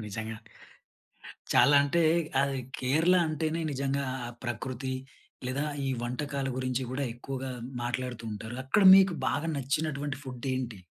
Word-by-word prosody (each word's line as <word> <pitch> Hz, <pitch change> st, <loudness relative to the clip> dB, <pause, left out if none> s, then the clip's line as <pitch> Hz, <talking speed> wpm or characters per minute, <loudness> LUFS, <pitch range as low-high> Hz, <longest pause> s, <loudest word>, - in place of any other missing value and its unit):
నిజంగా. 110 Hz, +2 st, -5 dB, 1.2 s
చాలా 140 Hz, +4 st, +6 dB
అంటే 170 Hz, +4 st, +2 dB, 0.4 s
అది 140 Hz, -1 st, 0 dB, 0.2 s
కేరళ 155 Hz, +8 st, +3 dB
అంటేనే 155 Hz, +1 st, -1 dB
నిజంగా, 140 Hz, +1 st, -1 dB, 0.2 s
ఆ -, -, -5 dB, 0.2 s
ప్రకృతి 130 Hz, +2 st, -3 dB, 0.5 s
లేదా 135 Hz, +3 st, -1 dB, 0.2 s
ఈ -, -, 0 dB
వంటకాల 135 Hz, +2 st, -2 dB
గురించి 130 Hz, 0 st, -1 dB
కూడా, 130 Hz, +2 st, -2 dB
ఎక్కువగా 130 Hz, +2 st, -5 dB, 0.3 s
మాట్లాడుతుంటారు. 120 Hz, -2 st, -4 dB
అక్కడ 135 Hz, +10 st, +3 dB
మీకు 190 Hz, -2 st, +5 dB
బాగా 145 Hz, +3 st, -1 dB
నచ్చినటువంటి 140 Hz, 0 st, -2 dB
ఫుడ్ 125 Hz, -1 st, -7 dB
ఏంటి? 120 Hz, -5 st, -4 dB
135 Hz, 120 wpm, -29 LUFS, 125-145 Hz, 1.2 s, చాలా